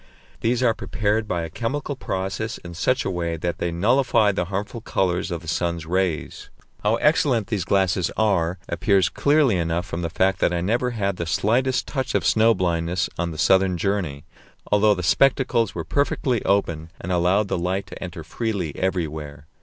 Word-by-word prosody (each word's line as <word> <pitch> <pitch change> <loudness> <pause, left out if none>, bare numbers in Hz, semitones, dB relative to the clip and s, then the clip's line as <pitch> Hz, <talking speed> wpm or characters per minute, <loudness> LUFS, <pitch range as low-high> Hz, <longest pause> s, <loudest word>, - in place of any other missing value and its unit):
These 120 +2 +1
are 115 -2 +4
prepared 110 0 -1
by 85 -3 -1
a 80 - -5
chemical 140 - -3
process 95 0 -3
in 85 -1 -10
such 125 +9 0
a - - 0
way 85 -2 -2
that 85 +2 -3
they 85 - -1
nullify 110 +3 +3
the 95 -2 -1
harmful 100 +5 -4
colours 90 -3 0
in 85 - -2
the 85 0 -13
sun's 85 0 -1
rays. 90 -1 -2 0.3
How 105 +2 +2
excellent 125 -7 +2
these 100 -7 -1
glasses 95 -3 +1
are 95 -5 +1
appears 95 +1 +2
clearly 145 -8 +3
enough 85 0 -1
from 85 -3 -5
the 85 - -2
fact 95 +3 +1
that - - +2
I 85 - 0
never 115 +8 0
had 100 -5 -2
the 85 - -3
slightest 125 +9 +1
touch 130 -3 -3
of - - +1
snow 115 +1 +4
blindness 85 0 -1
on 85 0 0
the 80 - -7
southern 95 +1 +3
journey, 85 -7 -2 0.5
although 105 0 +4
the 90 - -4
spectacles 125 - +2
were 85 -2 -4
perfectly 140 -4 0
open 85 -5 0
and 90 - -5
allowed 90 +4 +2
the 90 - -1
light 95 +3 -1
to 90 - -9
enter 85 -2 -7
freely 95 -2 -3
everywhere. 75 -6 -3
95 Hz, 185 wpm, -23 LUFS, 85-110 Hz, 0.5 s, are